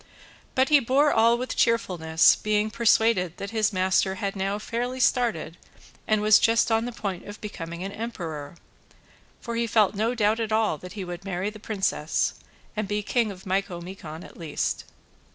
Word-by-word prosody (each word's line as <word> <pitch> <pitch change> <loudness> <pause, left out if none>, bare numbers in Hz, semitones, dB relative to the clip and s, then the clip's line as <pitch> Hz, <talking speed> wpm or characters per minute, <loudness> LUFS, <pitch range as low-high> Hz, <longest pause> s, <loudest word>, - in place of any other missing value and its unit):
But 260 0 +3
he 295 -1 +7
bore 275 +4 +3
all 230 +1 +4
with 255 +1 -4
cheerfulness, 175 -9 +3
being 215 0 0
persuaded 220 -6 +2
that 200 +1 -6
his 220 -2 +1
master 190 0 +1
had 200 -1 -3
now 195 +1 -1
fairly 240 +4 -3
started 230 -11 +1 0.5
and 215 -1 +2
was 215 0 +7
just 230 0 +3
on 225 +1 +2
the 245 - -4
point 195 -6 -5
of 205 +1 -9
becoming 170 -4 -6
an 195 - -4
emperor; 170 -10 -6 0.9
for 235 -1 -5
he 235 0 0
felt 210 -3 +3
no 225 +4 0
doubt 215 0 +2
at 225 -1 -2
all 215 -8 +1
that 180 - -10
he 200 -3 -5
would 175 +1 -7
marry 190 +1 -3
this 215 -1 -13
princess, 190 -8 -1 0.4
and 215 -2 -2
be 210 +1 -2
king 230 +1 +1
of 190 -2 -10
Micomicon 180 -4 -4
at - - -13
least. 160 -4 -3
210 Hz, 175 wpm, -26 LUFS, 185-230 Hz, 0.9 s, he